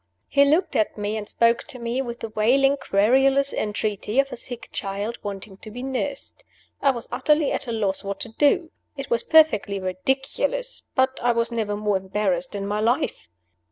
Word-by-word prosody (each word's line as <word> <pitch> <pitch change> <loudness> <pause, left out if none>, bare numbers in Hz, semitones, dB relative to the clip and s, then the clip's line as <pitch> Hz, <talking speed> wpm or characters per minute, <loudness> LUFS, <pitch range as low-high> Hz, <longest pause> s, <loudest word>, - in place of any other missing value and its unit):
He 280 0 +4
looked 315 +6 +2
at 215 - +1
me 210 +1 -2
and 215 -1 -5
spoke 230 0 +2
to 255 - -10
me 235 +2 -2
with 240 -2 -6
the 225 - -4
wailing, 265 +6 +3
querulous 270 +5 +3
entreaty 210 +2 -1
of 275 0 +2
a - - -4
sick 240 0 -8
child 200 +4 -4
wanting 200 -1 -7
to 215 - -11
be 245 +4 -7
nursed. 275 - -3 0.4
I 280 - +4
was 240 -4 -2
utterly 295 +4 +2
at 280 - -2
a - - -2
loss 205 -4 -1
what 200 0 -4
to 230 - -5
do. 295 +7 +2 0.3
It 275 - -6
was 235 - +2
perfectly 260 -11 +4
ridiculous 270 - -2
but 260 0 +2
I 240 0 +3
was 230 0 0
never 220 -3 -1
more 210 -1 +1
embarrassed 190 -1 -1
in 200 -1 -3
my 205 +1 -1
life. 230 +4 0
235 Hz, 190 wpm, -24 LUFS, 205-270 Hz, 0.4 s, He